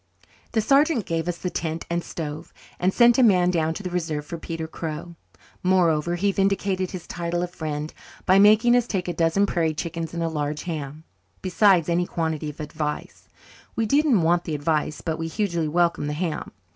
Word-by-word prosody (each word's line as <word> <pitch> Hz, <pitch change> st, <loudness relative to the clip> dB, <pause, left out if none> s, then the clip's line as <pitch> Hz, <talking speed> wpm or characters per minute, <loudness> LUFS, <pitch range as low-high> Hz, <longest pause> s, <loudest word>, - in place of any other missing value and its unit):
The 225 Hz, -, +3 dB
sergeant 275 Hz, -, +3 dB
gave 165 Hz, 0 st, -2 dB
us 175 Hz, -1 st, -2 dB
the 180 Hz, -, -4 dB
tent 165 Hz, 0 st, -3 dB
and 170 Hz, 0 st, -2 dB
stove, 155 Hz, 0 st, -6 dB, 0.3 s
and 185 Hz, +2 st, +2 dB
sent 240 Hz, +3 st, +5 dB
a -, -, +6 dB
man 180 Hz, -6 st, +5 dB
down 160 Hz, -2 st, 0 dB
to 205 Hz, -, -6 dB
the 180 Hz, -, -4 dB
Reserve 160 Hz, -4 st, -2 dB
for 170 Hz, +2 st, -6 dB
Peter 165 Hz, 0 st, -5 dB
Crow. 160 Hz, +1 st, -6 dB, 0.5 s
Moreover, 175 Hz, -3 st, +2 dB
he 200 Hz, +3 st, +1 dB
vindicated 195 Hz, -1 st, 0 dB
his 185 Hz, -3 st, -7 dB
title 175 Hz, 0 st, -2 dB
of 175 Hz, -, -4 dB
friend 155 Hz, -2 st, -4 dB, 0.3 s
by 190 Hz, +1 st, +5 dB
making 215 Hz, +4 st, +6 dB
us 245 Hz, -1 st, +2 dB
take 185 Hz, -3 st, -2 dB
a 175 Hz, -, -1 dB
dozen 170 Hz, +5 st, +2 dB
prairie 165 Hz, -5 st, 0 dB
chickens 165 Hz, 0 st, -4 dB
and 170 Hz, -, -1 dB
a -, -, +1 dB
large 150 Hz, -1 st, -3 dB
ham 155 Hz, -3 st, -5 dB, 0.4 s
besides 185 Hz, -2 st, +4 dB
any 175 Hz, +1 st, +1 dB
quantity 160 Hz, -2 st, -2 dB
of 150 Hz, -, -11 dB
advice. 150 Hz, 0 st, -5 dB, 0.5 s
We 225 Hz, -, +1 dB
didn't 275 Hz, -, +3 dB
want 170 Hz, +1 st, +2 dB
the 155 Hz, -, -2 dB
advice 150 Hz, 0 st, -1 dB
but 160 Hz, -2 st, -2 dB
we 165 Hz, -, -2 dB
hugely 170 Hz, -3 st, -1 dB
welcomed 170 Hz, -2 st, +1 dB
the -, -, -2 dB
ham. 160 Hz, 0 st, -3 dB
170 Hz, 195 wpm, -24 LUFS, 160-190 Hz, 0.5 s, a